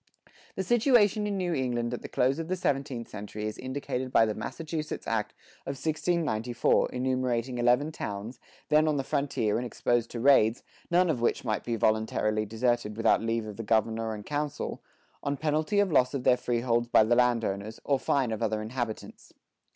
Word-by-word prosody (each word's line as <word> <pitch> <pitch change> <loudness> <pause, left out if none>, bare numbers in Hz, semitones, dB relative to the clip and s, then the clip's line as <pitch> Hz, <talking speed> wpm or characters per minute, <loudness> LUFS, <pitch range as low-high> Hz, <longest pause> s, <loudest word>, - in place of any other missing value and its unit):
The 190 - -2
situation 220 -2 +3
in 200 -1 -2
New 180 -2 -1
England 120 -4 -1
at 120 - -4
the - - -7
close 135 +4 +1
of 165 - -4
the 185 - 0
seventeenth 135 -7 -2
century 105 +1 -6
is 110 - -5
indicated 130 -1 -4
by 115 - +5
the 110 - -1
Massachusetts 155 +8 -5
act 110 -2 -2 0.3
of 135 - -3
1694 155 -6 0
enumerating 125 -1 -1
eleven 125 +6 +3
towns, 105 -2 -6 0.3
then 155 +1 +4
on 150 -2 +1
the 135 - -1
frontier 135 -8 0
and 120 - -2
exposed 120 0 0
to 120 - -6
raids, 120 -3 +4 0.3
none 180 +1 +4
of 125 -6 -3
which 120 - 0
might 110 -2 -1
be 120 - -2
voluntarily 110 0 +1
deserted 115 -1 -1
without 115 0 +3
leave 115 0 -1
of 105 -2 -8
the 115 - -4
governor 110 0 0
and 105 - -9
council, 150 -1 -3 0.4
on 140 0 -2
penalty 155 +5 0
of 200 -3 +2
loss 130 -2 +3
of 130 - -3
their 125 - +5
freeholds 120 -1 0
by 115 - +5
the 115 +2 +2
landowners, 115 -4 0
or 140 -2 +1
fine 130 -4 +1
of 110 - -3
other 110 -1 0
inhabitants. 115 -1 -6
125 Hz, 180 wpm, -28 LUFS, 115-145 Hz, 0.4 s, by